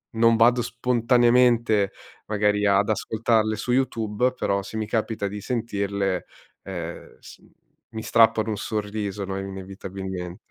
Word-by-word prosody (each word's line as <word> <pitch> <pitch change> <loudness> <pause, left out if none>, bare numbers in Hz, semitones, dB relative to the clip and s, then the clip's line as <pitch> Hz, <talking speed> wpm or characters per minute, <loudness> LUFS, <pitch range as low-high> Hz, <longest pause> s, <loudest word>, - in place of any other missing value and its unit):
non 115 0 +5
vado 120 +2 +4
spontaneamente, 120 -3 +3 0.4
magari, 105 -1 +1
ad 100 +1 +3
ascoltarle 110 0 +1
su 120 +3 -3
YouTube, 125 -2 +1
però 100 -5 -1
se 110 - -7
mi 110 - -1
capita 110 -2 -1
di 105 +1 -6
sentirle, 100 -5 -2 0.4
ehm, 85 -3 -7
s - - -14
mhmm, - - -23 0.4
mi 110 -1 -5
strappano 110 -1 +3
un 105 - -2
sorriso, 105 -2 -3
no, 95 0 -4
inevitabilmen 95 -1 -6
105 Hz, 130 wpm, -24 LUFS, 100-115 Hz, 0.4 s, non